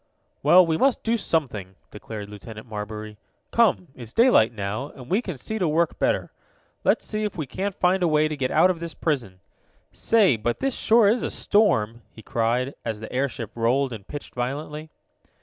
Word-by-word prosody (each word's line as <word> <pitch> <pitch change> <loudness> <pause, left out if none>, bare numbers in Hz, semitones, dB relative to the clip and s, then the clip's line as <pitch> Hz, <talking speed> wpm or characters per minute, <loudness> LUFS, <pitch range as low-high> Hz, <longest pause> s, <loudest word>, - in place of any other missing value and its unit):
"Well, 175 +5 +7
we 160 -1 0
must 270 +4 +2
do 230 +1 +1
something," 125 - -2 0.2
declared 105 0 -8
Lieutenant 110 +1 -10
Marbury. 105 -1 -7 0.3
"Come, 220 -6 +2
it's 120 -3 -10
daylight 230 - +5
now, 110 +5 -4
and 130 -1 -12
we 200 +5 +3
can 185 - -6
see 220 - -4
to 180 - +1
work 160 +2 +1
better. - - 0 0.5
Let's - - +2
see 215 0 -3
if 210 -4 -3
we 155 - -2
can't 190 +9 -4
find 185 +1 +2
a 175 - +3
way 155 -1 +3
to 155 - -4
get 130 -3 -1
out 185 - +4
of 175 - -5
this 170 -1 -6
prison. 120 - -2 0.5
Say, 205 - +3
but 120 +2 -2
this 270 -2 -1
sure 225 -1 +4
is 230 +4 +3
a - - -2
storm!" 120 - +1
he 110 - -15
cried, 120 +5 0
as 110 -2 -3
the 110 - -8
airship 125 -4 -2
rolled 125 +3 +1
and 105 -3 -9
pitched 145 - -8
violently. 150 +5 -4
140 Hz, 190 wpm, -24 LUFS, 115-180 Hz, 0.5 s, Well